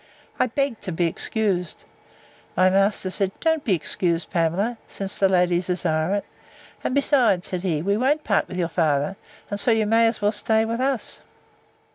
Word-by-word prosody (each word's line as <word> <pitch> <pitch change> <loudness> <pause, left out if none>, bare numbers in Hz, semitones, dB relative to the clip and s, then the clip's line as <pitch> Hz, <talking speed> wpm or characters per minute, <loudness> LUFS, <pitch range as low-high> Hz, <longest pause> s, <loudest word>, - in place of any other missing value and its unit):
I - - +3
begged 270 -1 -2
to 195 - -4
be 175 +1 0
excused. 180 0 -2 0.7
My 185 +1 +5
master 195 -1 +2
said, 195 0 -1
Don't 320 -2 +1
be 195 - +2
excused, 170 +1 -1
Pamela, 190 +7 0
since 195 0 -3
the 195 - +4
ladies 180 -1 +2
desire 170 0 0
it: 205 - -3 0.6
And 255 - -1
besides, 250 -10 +3
said 180 -2 -3
he, 165 -5 -1
we 200 +2 +1
won't 280 +6 +1
part 200 - +1
with 180 - -7
your 175 -2 0
father; 155 0 0 0.4
and 205 - -2
so 240 - +2
you 225 -2 +3
may 225 +2 +4
as 225 - -1
well 205 0 +2
stay 220 +1 +1
with 230 +1 -3
us. 265 -2 -2
195 Hz, 180 wpm, -23 LUFS, 180-225 Hz, 0.7 s, My